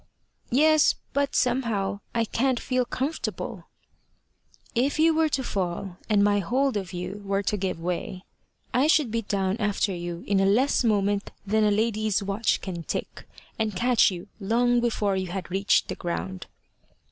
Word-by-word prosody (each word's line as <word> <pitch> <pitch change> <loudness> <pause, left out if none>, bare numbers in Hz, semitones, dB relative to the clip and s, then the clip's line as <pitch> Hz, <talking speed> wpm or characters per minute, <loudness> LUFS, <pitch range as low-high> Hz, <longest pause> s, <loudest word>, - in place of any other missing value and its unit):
"Yes, 310 +4 +4 0.2
but 280 0 0
somehow 230 -6 0 0.2
I 230 -1 +2
can't 250 +3 0
feel 255 -1 0
comfortable." 275 +6 -4 1.1
"If 260 +5 +1
you 320 +1 +4
were 315 0 +2
to 270 -2 -1
fall, 180 -3 -3
and 205 -2 +4
my 205 0 +3
hold 260 +7 0
of 190 -3 -3
you 180 +3 -5
were 195 0 -1
to 210 - 0
give 185 -4 -2
way, 180 +2 -4 0.5
I 255 +5 +3
should 300 -7 +3
be 230 0 0
down 195 -1 -1
after 210 -2 0
you 175 -1 -5
in 200 -1 +2
a 195 - +3
less 255 +7 +3
moment 205 -2 +1 0.2
than 215 +2 +2
a 210 - +4
lady's 215 -1 +1
watch 200 +3 0
can 180 -3 -5
tick, - - -5 0.3
and 215 -3 -1
catch 245 +5 +4
you 180 -1 -7
long 240 +4 +2
before 220 -4 0
you 190 -1 -2
had 180 0 -5
reached 195 +2 +2
the - - -3
ground." 95 - -4
205 Hz, 165 wpm, -26 LUFS, 190-245 Hz, 1.1 s, Yes